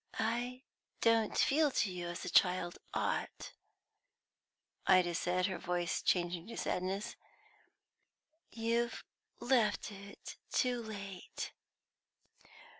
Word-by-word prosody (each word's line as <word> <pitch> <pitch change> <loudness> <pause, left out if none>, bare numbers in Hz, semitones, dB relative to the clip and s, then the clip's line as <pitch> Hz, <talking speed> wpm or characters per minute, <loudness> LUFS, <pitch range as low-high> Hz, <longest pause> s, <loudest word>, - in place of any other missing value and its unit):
"I 245 +3 -1 0.4
don't 225 -2 +3
feel 300 +2 +4
to 220 -7 +1
you 175 -1 -4
as 175 0 -5
a - - -2
child 180 -2 +3
ought," - - -2 1.4
Ida 180 -2 +5
said, 180 +1 +1
her 190 -2 -2
voice 175 0 -1
changing 175 0 +1
to 230 - -7
sadness. 195 +5 -2 1.3
"You've 235 +1 0 0.4
left 235 -5 +2
it 200 0 -10
too 250 -2 +2
late." 200 -4 -6
200 Hz, 100 wpm, -35 LUFS, 180-235 Hz, 1.4 s, Ida